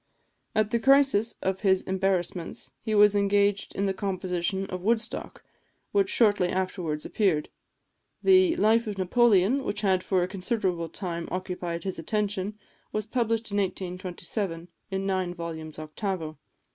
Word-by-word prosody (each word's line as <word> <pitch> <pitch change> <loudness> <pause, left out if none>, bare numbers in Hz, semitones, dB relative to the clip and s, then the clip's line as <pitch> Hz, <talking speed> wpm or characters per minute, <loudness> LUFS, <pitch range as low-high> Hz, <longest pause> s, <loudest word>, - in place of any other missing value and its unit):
At 215 0 +2
the 235 - +2
crisis 270 -4 +4
of 190 0 0
his 190 -2 +3
embarrassments 190 -2 -1
he 220 -1 -1
was 210 0 +6
engaged 200 0 +2
in 200 - 0
the 195 - +1
composition 190 -1 -2
of 185 -1 -5
"Woodstock," 225 +3 -1 0.5
which 200 -1 +2
shortly 205 -6 +4
afterwards 180 -5 -2
appeared. 185 -8 +1 0.7
The 370 -3 +5
"Life 225 -5 +3
of 205 -2 -4
Napoleon," 220 +5 +3
which 205 -2 -2
had 190 -3 +2
for 185 -2 +1
a - - -1
considerable 185 -3 -2
time 170 -1 -4
occupied 180 -2 -4
his 190 -3 -4
attention, 205 +2 -2 0.3
was 215 -1 -2
published 225 -1 -1
in 205 - -1
1827, 180 -1 -3 0.2
in 195 0 -2
nine 185 -2 -1
vols. 160 -2 -6
octavo. 155 0 -4
195 Hz, 140 wpm, -27 LUFS, 180-210 Hz, 0.7 s, was